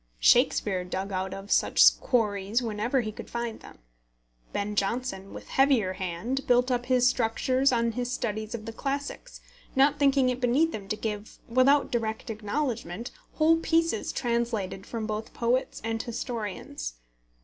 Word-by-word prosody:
Shakespeare 180 - +3
dug 190 +2 -4
out 190 0 -2
of 195 +1 -7
such - - +5
quarries 210 -3 +1
wherever 230 +4 0
he 215 -2 -4
could - - -10
find 235 -1 -4
them. - - -14 0.7
Ben 205 +1 -2
Jonson, 200 -1 -2
with - - -10
heavier 265 -9 +3
hand, 190 +10 -3
built 250 +1 +3
up 245 0 -1
his 250 -1 +4
structures 255 +2 +2
on 235 -1 +1
his 245 +1 -3
studies 220 -1 -3
of 215 -2 -7
the 225 - -6
classics, 280 - -4 0.3
not 275 +2 +4
thinking 275 -2 +4
it 250 0 -2
beneath 275 +7 +2
him 200 -2 -6
to 215 - -1
give, 210 -1 -5
without 260 +4 +4
direct 225 -2 -2
acknowledgment, 225 - -3 0.2
whole 320 +1 +4
pieces 330 -7 +1
translated 235 -6 -1
both - - -17
from 220 -2 -3
poets 245 +2 0
and 225 0 -1
historians. 215 - -5
230 Hz, 150 wpm, -27 LUFS, 210-255 Hz, 0.7 s, such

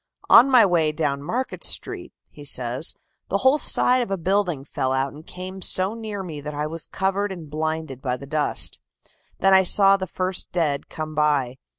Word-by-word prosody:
"On 270 - +8
my 250 -5 +6
way 165 -5 +1
down 145 -3 -2
Market 245 - -4
Street," - - -3 0.2
he 145 - -13
says, 125 +1 0 0.3
"the 200 - +1
whole 260 +8 +3
side 250 -2 +3
of 240 - -3
a 195 - -1
building 180 -5 -1
fell 130 -3 -2
out 135 +1 -1
and 155 +2 -14
came 185 +1 -8
so 185 +3 +3
near 215 -3 -6
me 155 -5 -7
that 150 +1 -7
I 150 +1 -2
was 160 +1 -5
covered 195 +1 -1
and 165 -5 -9
blinded 155 -3 -4
by 125 -2 -2
the 140 - -10
dust. 150 +1 0 0.6
Then 195 0 +4
I 190 - +7
saw 195 +1 +5
the 190 -1 -5
first 185 +1 -3
dead 150 -5 -1
come 155 0 -6
by. 145 -4 0
165 Hz, 195 wpm, -23 LUFS, 145-195 Hz, 0.6 s, On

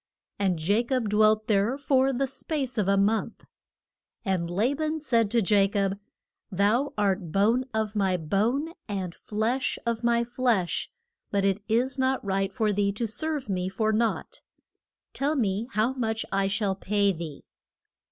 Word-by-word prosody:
And 185 -4 +1
Ja 200 +8 +2
cob 245 -3 -1
dwelt 215 +1 +3
there 215 +5 +1
for 270 -1 +2
the 270 +1 0
space 270 -2 -3
of 200 - +1
a 200 0 +3
month. 210 +3 0 0.8
And 185 -4 0
La 210 +10 +1
ban 310 +2 -2
said 230 -8 +2
to 230 0 +2
Ja 200 0 +4
cob, 195 -1 -1 0.5
Thou 210 +9 +2
art 195 -4 0
bone 225 +7 +2
of 220 -1 -2
my 190 -3 +1
bone 225 - 0 0.2
and 190 -4 -3
flesh 225 +8 -1
of 235 0 -1
my 235 0 +3
flesh, 235 -7 0 0.4
but 200 -1 +1
it 195 +1 +1
is 250 +5 +1
not 260 -3 +1
right 195 0 0
for 210 +1 0
thee 200 0 +1
to 230 +3 -2
serve 295 +5 -1
me 185 -2 -1
for 215 +3 0
nought. 225 +1 -1 0.7
Tell 290 +3 0
me 215 -3 0
how 220 +5 +1
much 225 -3 -2
I 195 0 +1
shall 205 0 0
pay 200 +1 +1
thee? 160 -5 -7
215 Hz, 160 wpm, -27 LUFS, 195-245 Hz, 0.8 s, Ja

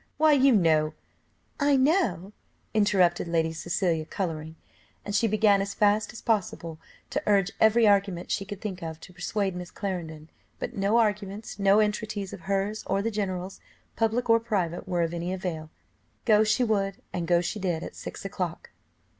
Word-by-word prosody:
why 310 0 +5
you 275 -1 +5
know 160 -7 +3 0.3
" - - -41
"I 285 -1 +4
know," 260 - +1 0.4
interrupted 190 -5 +3
Lady 165 -1 0
Cecilia, 170 0 -1
colouring, 160 -2 -4 0.5
and 205 - -4
she 225 +3 +3
began 210 -2 +4
as 200 0 -4
fast 210 0 +2
as 230 - -11
possible 180 -7 -1 0.3
to - - -1
urge 200 -2 +3
every 220 +1 +5
argument 195 -3 +1
she - - 0
could 200 0 -8
think 190 -4 -5
of 160 -1 -6
to 180 - -13
persuade 190 +2 -2
Miss 180 0 -6
Clarendon; 165 -5 -5 0.3
but - - -5
no 200 +3 +2
arguments, 210 -2 -1
no 195 +1 +5
entreaties 210 -2 -1
of - - -8
hers 200 +2 -1
or 195 +1 0
the 225 - -1
general's, 190 -3 -3 0.4
public 225 +2 0
or 230 0 +5
private, 190 -6 -2
were 175 -2 +1
of 165 0 -2
any 175 +1 -3
avail, 170 -4 -4 0.6
go 215 -2 +5
she 215 +4 +2
would, 200 -4 0 0.2
and 175 -2 -2
go 175 0 +4
she 180 +5 -3
did 175 -4 -1
at - - -8
six - - -8
o'clock. - - -4
195 Hz, 175 wpm, -27 LUFS, 175-215 Hz, 0.6 s, why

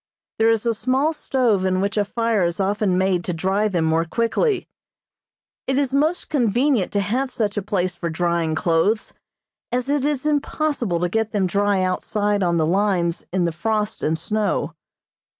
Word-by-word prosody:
There 225 0 +4
is 225 0 +1
a 230 - +2
small 260 +7 +1
stove 245 -10 +1
in 185 0 +1
which 200 +2 -1
a 210 - +2
fire 225 -1 0
is 170 +1 -1
often 195 -1 +1
made 185 -2 +1
to 180 - -2
dry 190 +5 +1
them 175 -5 0
more 160 +1 +2
quickly. 235 - 0 1.0
It 265 0 +1
is 275 -2 0
most 310 +5 +1
convenient 245 - +1
to 200 - +2
have 250 +7 -1
such 215 -5 -2
a 205 - -1
place 185 -2 -1
for 170 - -3
drying 170 -1 0
clothes, 170 +7 +1 0.6
as 250 +2 -1
it 290 -2 +1
is 290 -1 -1
impossible 290 - 0
to 175 - +2
get 220 +4 -1
them 200 -3 +1
dry 200 +1 +1
outside 205 +2 0
on 170 -2 +1
the 160 - +2
lines 180 -1 0
in 180 -1 +1
the 170 - 0
frost 215 +5 -2
and 160 +1 0
snow. 200 -1 -1
205 Hz, 180 wpm, -22 LUFS, 180-235 Hz, 1.0 s, There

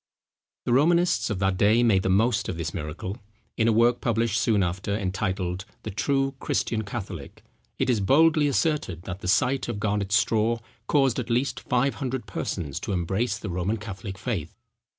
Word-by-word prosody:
The 120 - +1
Romanists 170 +5 +3
of 105 - -1
that 95 0 +1
day 110 +5 +4
made 105 -5 +4
the 95 - -1
most 110 +4 +2
of 90 - -3
this 80 -1 -3
miracle. 90 +4 -5 0.4
In 110 - +2
a - - +5
work 115 +2 +3
published 115 0 +1
soon 105 -5 +3
after, 95 +3 -2
entitled, 95 -2 -2 0.2
The 110 - -4
True 135 +6 0
Christian 110 -2 -1
Catholic, 105 0 -7 0.3
it - - 0
is 120 -4 +2
boldly 150 +8 +4
asserted 140 - 0
that 95 0 -6
the 90 - -6
sight 130 +8 +2
of 115 -4 -3
Garnet's 100 -1 0
straw 115 0 +2 0.3
caused 135 -4 +3
at 125 - -4
least 125 +4 0
five 125 +2 +1
hundred 130 -3 -2
persons 85 -6 -4
to 105 - -3
embrace 95 +6 0
the 105 -4 -6
Roman 90 +5 -1
Catholic 100 -2 -7
faith. 95 - -4
110 Hz, 175 wpm, -26 LUFS, 95-125 Hz, 0.4 s, a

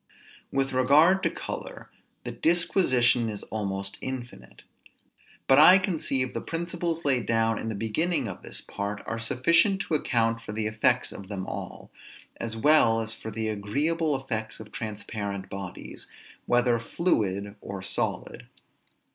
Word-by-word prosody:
With 135 -1 0
regard 150 +9 +5
to - - +2
color, - - -7 0.3
the 120 - -5
disquisition 125 - +3
is 105 -2 -6
almost 100 -2 -3
infinite; 120 - -7 0.8
but 135 +1 +6
I 180 +5 +9
conceive 150 -9 0
the - - -3
principles 170 0 -3
laid 130 -4 +2
down 115 0 +2
in 115 - -4
the 110 - -3
beginning 115 - 0
of 95 - -7
this - - -6
part 100 +1 -5
are 115 - -4
sufficient 165 - +3
to 165 - -4
account 115 -6 +1
for 105 - -7
the 110 0 -2
effects 110 0 +1
of 100 - -9
them 95 -3 -4
all, - - -7 0.5
as 115 -1 -5
well 115 -3 +5
as 115 0 -3
for 110 - -8
the 110 +1 -3
agreeable 145 +10 0
effects 115 -5 -4
of 110 -1 -11
transparent 105 -2 -5
bodies, 95 -2 -7 0.4
whether 120 -1 +3
fluid 105 - -1
or 100 -1 -7
solid. - - -3
115 Hz, 145 wpm, -27 LUFS, 105-145 Hz, 0.8 s, I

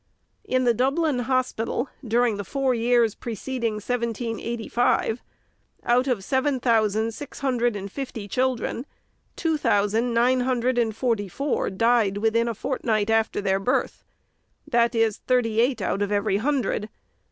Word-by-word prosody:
In 255 0 0
the 240 -1 +4
Dublin 275 +3 +1
Hospital, 250 0 -1 0.2
during 235 -2 +1
the 205 - -4
four 270 +4 0
years 235 -2 +2
preceding 235 0 -3
1785, 235 +1 -1 0.6
out 250 +2 +2
of 240 -7 0
seven 265 +3 0
thousand 220 -2 +2
six 290 - -9
hundred 240 -4 +1
and 200 -1 -6
fifty 235 -6 -6
children, 255 +2 -1 0.5
two 320 -3 0
thousand 225 -1 +1
nine 245 +2 +3
hundred 250 0 +1
and 225 -3 0
forty 225 -5 0
four 275 +9 -1
died 215 0 +2
within 225 +2 +1
a 230 - -2
fortnight 225 -4 -1
after 225 -1 +1
their 195 -1 +1
birth; 250 +7 -1 0.6
that 235 0 +2
is, 225 -2 +2
thirty 230 -3 +1
eight 250 +2 +1
out 195 - -1
of 205 0 -1
every 205 -1 +1
hundred. 240 -4 -1
235 Hz, 140 wpm, -24 LUFS, 220-255 Hz, 0.6 s, the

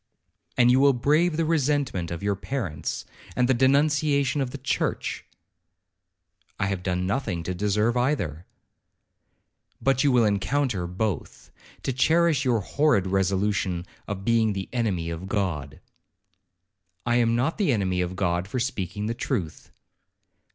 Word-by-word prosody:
'And 125 0 +6
you 130 - +4
will 140 0 +5
brave 155 +6 +2
the 165 - +1
resentment 145 - 0
of 85 +2 -5
your 100 0 +1
parents, 100 - -4 0.3
and 125 -1 +2
the 130 - +4
denunciations 140 +1 +2
of 130 - -1
the 140 - -7
church.' 130 -1 -2 1.4
'I - - +1
have 95 -2 -2
done 90 -1 -1
nothing 100 -4 -2
to 90 - -3
deserve 105 +5 +1
either.' 110 - -1 1.3
'But 135 0 +2
you 145 - +4
will 120 -3 +4
encounter 105 -1 0
both, 95 -1 -4 0.3
to 135 - -1
cherish 160 +2 +3
your 120 -5 +2
horrid 140 -2 +2
resolution 95 -1 0 0.2
of 100 -1 -5
being 115 -2 +3
the 95 -1 -5
enemy 95 -9 -1
of 85 +3 -6
God.' 85 -10 -2 1.3
'I 120 0 +2
am 115 -1 +3
not 130 - 0
the 195 -8 +3
enemy 95 -5 0
of 90 +1 -3
God 90 -1 0
for 125 +6 -3
speaking 105 -6 -3
the 115 - -1
truth.' 105 - -4
110 Hz, 145 wpm, -25 LUFS, 95-135 Hz, 1.4 s, And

